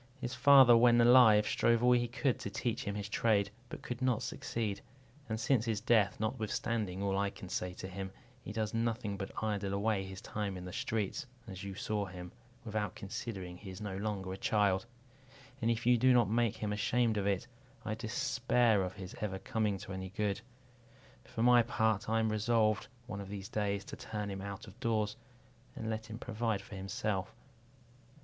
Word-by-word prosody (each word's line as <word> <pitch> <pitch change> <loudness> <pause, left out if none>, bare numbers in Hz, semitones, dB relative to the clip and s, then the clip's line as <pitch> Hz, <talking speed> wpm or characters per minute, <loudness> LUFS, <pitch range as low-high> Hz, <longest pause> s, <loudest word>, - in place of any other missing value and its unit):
His 125 0 -4
father, 135 -3 +8
when 120 0 +6
alive, 120 -3 +7
strove 115 0 +2
all 125 - +6
he 120 -1 +3
could 130 +1 0
to - - -4
teach 115 +3 -2
him 100 -1 -2
his 105 -1 -4
trade, 100 -2 +2 0.2
but - - -8
could 125 +1 -5
not 125 -3 +1
succeed; 105 -4 -3 0.5
and 110 0 -2
since 120 0 +2
his 115 -3 -1
death, 110 -3 +3
notwithstanding 110 -3 -2
all 100 -1 +1
I 100 0 +1
can 95 -1 -10
say 90 0 -3
to 95 - -6
him, 95 0 -6 0.3
he - - -7
does 110 0 -2
nothing 115 -3 -1
but 95 0 -5
idle 100 -2 -1
away 100 -1 +1
his 95 0 -8
time 100 -3 -4
in 90 - -7
the 90 - -7
streets, 110 +6 -2 0.2
as 95 -2 -7
you 100 -1 -6
saw 105 0 -2
him, 90 -1 -8 0.3
without 105 -3 -2
considering 95 -4 -6
he 100 +1 -10
is 95 0 -8
no 105 -3 -4
longer 100 -2 -3
a - - -6
child; 100 0 +1 0.7
and 115 - +2
if 115 0 0
you 120 -1 +5
do 130 +2 +5
not 120 -3 +5
make 115 0 +1
him 105 -1 -2
ashamed 110 +2 +1
of 100 -1 0
it, 100 +3 0 0.4
I 110 - -1
despair 110 0 +1
of 95 0 -3
his 95 -2 -8
ever 100 -3 -2
coming 105 +1 -1
to 95 - -8
any 95 0 -5
good. 100 +1 -1 0.8
For 115 - -3
my 120 0 +7
part, 110 -2 0
I 115 0 +2
am 110 0 +2
resolved, 110 +1 +2 0.2
one 100 -4 -5
of 100 - -8
these 100 -1 -6
days, 100 -1 -1
to - - -7
turn 105 -2 -5
him 95 0 -5
out 100 +2 -6
of 105 +2 -14
doors, 110 -3 0 0.6
and 110 0 -3
let 110 0 -4
him 110 - -6
provide 115 -4 -2
for 120 - -13
himself." 95 0 -3
105 Hz, 195 wpm, -33 LUFS, 100-115 Hz, 0.8 s, father